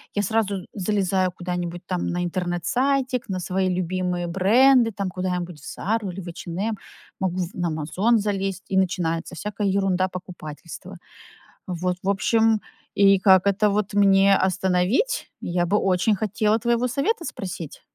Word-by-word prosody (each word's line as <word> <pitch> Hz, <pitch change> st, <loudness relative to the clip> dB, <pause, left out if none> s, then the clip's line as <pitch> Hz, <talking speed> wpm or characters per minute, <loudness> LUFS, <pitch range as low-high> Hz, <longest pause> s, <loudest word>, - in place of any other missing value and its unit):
Я 205 Hz, -, +1 dB
сразу 200 Hz, -2 st, 0 dB
залезаю 190 Hz, -2 st, 0 dB
куда-нибудь 175 Hz, -1 st, -4 dB
там 180 Hz, -2 st, -2 dB
на 175 Hz, 0 st, -1 dB
интернет-сайтик, 245 Hz, -, -1 dB
на 185 Hz, -1 st, -2 dB
свои 185 Hz, +1 st, 0 dB
любимые 180 Hz, -1 st, -1 dB
бренды, 230 Hz, +7 st, +4 dB
там, 195 Hz, -2 st, -3 dB
куда-нибудь 180 Hz, -3 st, -3 dB
в -, -, -13 dB
"Зару" 210 Hz, 0 st, -2 dB
или 190 Hz, +2 st, -7 dB
в 175 Hz, -, -10 dB
"Эйч 170 Hz, +1 st, -8 dB
энд 170 Hz, +2 st, -4 dB
эм" 215 Hz, 0 st, -1 dB, 0.4 s
могу 185 Hz, -1 st, -1 dB
в 175 Hz, -, -7 dB
на 175 Hz, -1 st, -1 dB
"Амазон" 185 Hz, +9 st, +1 dB
залезть, 195 Hz, -2 st, -2 dB
и 190 Hz, -, 0 dB
начинается 175 Hz, -2 st, 0 dB
всякая 205 Hz, +2 st, -3 dB
ерундо-покупательство. 185 Hz, -4 st, -3 dB, 0.7 s
Вот, 180 Hz, 0 st, -2 dB
в 195 Hz, -, 0 dB
общем, 220 Hz, +2 st, +3 dB, 0.4 s
и 195 Hz, -1 st, +5 dB
как 190 Hz, 0 st, +5 dB
это 205 Hz, +1 st, +3 dB
вот 205 Hz, 0 st, -1 dB
мне 195 Hz, -1 st, +5 dB
остановить? 190 Hz, -, +1 dB
Я 175 Hz, 0 st, 0 dB
бы 205 Hz, +4 st, +2 dB
очень 190 Hz, +3 st, +2 dB
хотела 215 Hz, +2 st, +1 dB
твоего 240 Hz, +2 st, +1 dB
совета 295 Hz, -, -1 dB
спросить. 175 Hz, -, -6 dB
190 Hz, 150 wpm, -23 LUFS, 180-210 Hz, 0.7 s, и